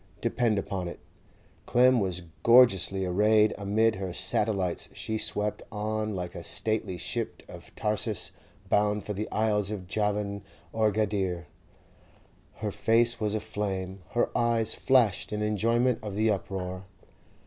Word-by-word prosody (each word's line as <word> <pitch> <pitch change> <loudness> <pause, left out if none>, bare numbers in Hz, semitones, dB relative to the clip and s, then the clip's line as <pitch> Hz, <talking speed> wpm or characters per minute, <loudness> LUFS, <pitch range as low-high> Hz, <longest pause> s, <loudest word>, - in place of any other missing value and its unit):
Depend 115 -1 +1
upon 95 -2 -3
it, 85 - -8 0.7
Clem 125 0 +5
was 95 -3 -1 0.2
gorgeously 100 -6 +5
arrayed; 105 +4 +3
amid 110 +2 +1
her 95 -2 -4
satellites 95 -4 0
she 110 0 -3
swept 105 0 0
on 110 0 -2
'like 90 -1 -5
a 85 - -8
stately 110 -4 -1
ship - - -3
of - - -12
Tarsus, 105 -1 -1 0.4
bound 105 0 +1
for 105 - -3
the 105 +2 -4
isles 105 -2 +1
of 100 -4 -5
Javan 105 +1 -1 0.3
or 110 -1 +2
Gadire;' 95 -5 -1 1.1
her - - -4
face 115 +1 +2
was 105 -1 0
aflame, 95 -3 -4
her 120 - 0
eyes 115 -2 +2
flashed 120 -7 +2
in 105 0 -2
enjoyment 115 +4 +1
of 105 -2 -6
the 110 +1 +2
uproar. 95 -1 -4
105 Hz, 135 wpm, -28 LUFS, 95-110 Hz, 1.1 s, Clem